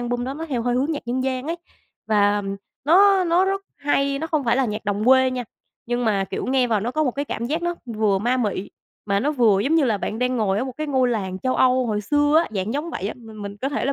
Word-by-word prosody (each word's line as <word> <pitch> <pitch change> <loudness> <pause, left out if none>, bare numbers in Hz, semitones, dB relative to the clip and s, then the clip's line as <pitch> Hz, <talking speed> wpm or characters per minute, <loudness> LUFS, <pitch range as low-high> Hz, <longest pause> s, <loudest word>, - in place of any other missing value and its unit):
album 245 0 -2
đó 265 +2 -4
nó 320 +3 -6
theo 255 -6 -2
hơi 245 +1 0
hướng 275 +6 +1
nhạc 295 - -5
dân 255 +2 -1
gian 260 0 -2
ấy, 335 +2 -2 0.5
và, 205 -1 +3
ừm, 195 -1 -4 0.3
nó 380 +4 +5
nó 345 +2 +3
rất 390 +1 -1
hay, 280 -1 0
nó 320 - -3
không 310 -3 -1
phải 235 0 +2
là 270 - +2
nhạc 215 -2 -4
đồng 205 0 -1
quê 260 +1 +5
nha, 250 -1 -3 0.4
nhưng 240 +1 -1
mà, 200 -3 +1
kiểu, - - -5
nghe 260 -1 +2
vào, 220 -4 +1
nó 230 +4 -2
có 310 +4 0
một 260 - +1
cái 285 +3 -3
cảm 235 -4 -4
giác 315 +6 -2
nó 345 0 -1
vừa 215 -4 +1
ma 240 +6 +1
mị 205 -5 -2 0.4
mà 200 -1 +1
nó 285 - +1
vừa 225 -8 +3
giống 275 +9 +1
như 320 -3 +4
là 220 -5 +1
bạn 215 - -4
đang 250 +1 0
ngồi 205 -4 +1
ở 250 - -1
một 260 - -5
cái 310 - -3
ngôi 260 -3 +2
làng 190 -6 -2
châu 255 +5 -1
Âu 255 0 +3
hồi 210 -2 -1
xưa 290 +6 +2
á, 335 - +1
dạng 195 +3 -2
giống 305 +4 -3
vậy 200 - -3
á. - - -5
Mình 220 -3 -11
mình 200 0 -6
có 260 +6 -2
thể 290 - -2
là 275 - +1
250 Hz, 290 wpm, -22 LUFS, 215-285 Hz, 0.5 s, nó